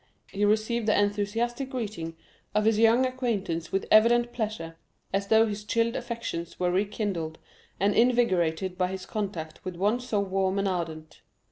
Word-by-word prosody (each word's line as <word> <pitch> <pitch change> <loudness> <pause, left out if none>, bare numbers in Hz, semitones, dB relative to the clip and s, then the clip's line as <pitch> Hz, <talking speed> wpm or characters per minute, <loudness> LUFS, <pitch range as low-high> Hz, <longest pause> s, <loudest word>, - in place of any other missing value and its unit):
He 205 +1 +1
received 220 +2 +1
the 215 - +4
enthusiastic 225 +6 -1
greeting 210 - -4 0.4
of 210 0 +2
his 220 -1 +3
young 230 +3 +5
acquaintance 215 -10 -2
with 195 - 0
evident 240 +2 +5
pleasure, 210 -8 -4 0.4
as 200 0 0
though 220 +1 +5
his 210 -1 -4
chilled 230 +3 0
affections 235 -9 -5
were 180 -1 +1
rekindled 190 -4 -2 0.4
and 200 +2 +3
invigorated 190 -7 +2
by 180 - +3
his 190 0 -6
contact 190 -7 -5
with 185 -2 -5
one 205 +7 +1
so 245 -4 -1
warm 195 -1 0
and 195 0 +1
ardent. 160 -4 -4
205 Hz, 155 wpm, -27 LUFS, 185-230 Hz, 0.4 s, young